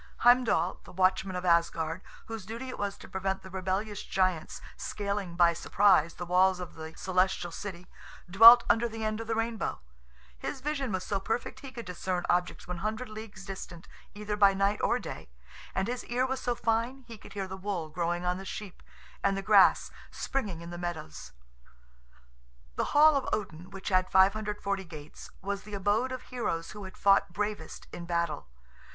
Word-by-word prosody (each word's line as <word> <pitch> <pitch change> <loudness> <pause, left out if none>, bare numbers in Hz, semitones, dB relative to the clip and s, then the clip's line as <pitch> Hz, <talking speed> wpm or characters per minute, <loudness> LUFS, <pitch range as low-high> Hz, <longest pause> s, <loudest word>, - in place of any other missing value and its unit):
Heimdall, 240 -8 +4
the - - -13
watchman 185 +1 +1
of 180 0 -3
Asgard, 170 0 +2 0.2
whose 225 -2 -6
duty 230 +6 -6
it 255 - -7
was 200 -1 -2
to - - -12
prevent 190 0 -2
the 190 - -11
rebellious 190 +3 -2
giants 185 -4 -1 0.2
scaling 200 -4 -3
by 170 -1 +5
surprise 170 -2 +3
the 175 - -5
walls 185 +1 +3
of 180 -2 -7
the 160 0 -9
celestial 185 -1 +1
city, 180 -1 -7 0.4
dwelt 230 +6 +10
under 235 +1 +3
the 225 0 -6
end 215 +1 -1
of 225 - -7
the 225 - 0
rainbow; 225 -1 -2 0.6
his 65 - -5
vision 275 -3 -2
was 185 -2 -2
so 200 - -1
perfect 225 +5 -3
he 270 - -9
could 235 -3 -8
discern 180 0 -3
objects 175 0 -1
100 215 +7 -3
leagues 215 -3 -9
distant, 185 -3 -8 0.3
either 210 0 -3
by 200 -2 +5
night 200 +1 +1
or - - +2
day, - - -8 0.5
and 190 +1 0
his 245 +1 -3
ear 250 +2 0
was 265 0 -2
so 245 - 0
fine 235 +4 -1
he 230 - -8
could - - -13
hear 195 -2 -3
the 190 - -6
wool 190 -4 -3
growing 175 +2 -1
on 180 +1 0
the - - -7
sheep, 195 -1 -7 0.4
and 195 0 +2
the 195 - -3
grass 205 -2 +5 0.2
springing 205 -11 -3
in 170 0 -8
the 175 - -6
meadows. 160 - -6 1.4
The - - 0
hall 305 0 +8
of 275 - 0
Odin, 180 -4 -3
which 195 -1 -6
had 185 -1 +2
540 200 0 +2
gates, 155 -4 -11
was 200 +1 -2
the 210 0 -8
abode 205 +6 +1
of 255 - -5
heroes 215 -10 -3
who 210 -2 -8
had 190 - -11
fought 195 -3 +4
bravest 205 -4 -4
in 170 - -6
battle. 170 - -1
195 Hz, 180 wpm, -29 LUFS, 180-215 Hz, 1.4 s, dwelt